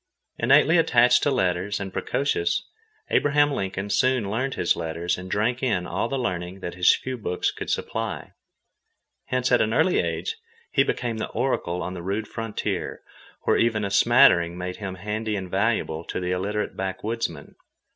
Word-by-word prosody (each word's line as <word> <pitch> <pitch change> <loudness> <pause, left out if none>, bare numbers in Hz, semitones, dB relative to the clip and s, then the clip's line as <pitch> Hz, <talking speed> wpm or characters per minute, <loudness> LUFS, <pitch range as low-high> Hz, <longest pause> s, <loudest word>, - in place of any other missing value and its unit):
Innately 140 +7 +5
attached 125 -5 +5
to - - +2
letters, 95 -5 0
and 95 -1 -5
precocious, 85 -11 0 0.5
Abraham 145 0 +3
Lincoln 100 -3 -3
soon 125 -4 +2
learned 130 +5 -1
his - - +2
letters 85 +2 -2
and 90 +1 -8
drank 115 +6 0
in 110 -9 0
all 115 - -2
the 135 - -1
learning 90 -5 -3
that 85 - -5
his 90 -1 +5
few 130 -1 -5
books 90 -4 -1
could - - -7
supply. - - -3 0.9
Hence 125 0 0
at 125 - +5
an 110 +1 +1
early 160 +5 +3
age 450 0 -2 0.3
he - - +3
became 120 -2 -1
the 110 - -3
oracle 90 -9 -1
on 90 - -4
the 90 - -6
rude 100 +4 -2
frontier, 115 -2 -4 0.4
where - - +3
even 110 -3 +1
a 100 - -3
smattering 95 -6 +5
made 90 0 -5
him 95 -3 -5
handy 105 +3 -3
and 95 -2 -5
valuable 95 -6 0
to - - -4
the 90 0 -2
illiterate 100 +3 -2
backwoodsmen. 95 -3 -4
105 Hz, 165 wpm, -25 LUFS, 90-125 Hz, 0.9 s, Innately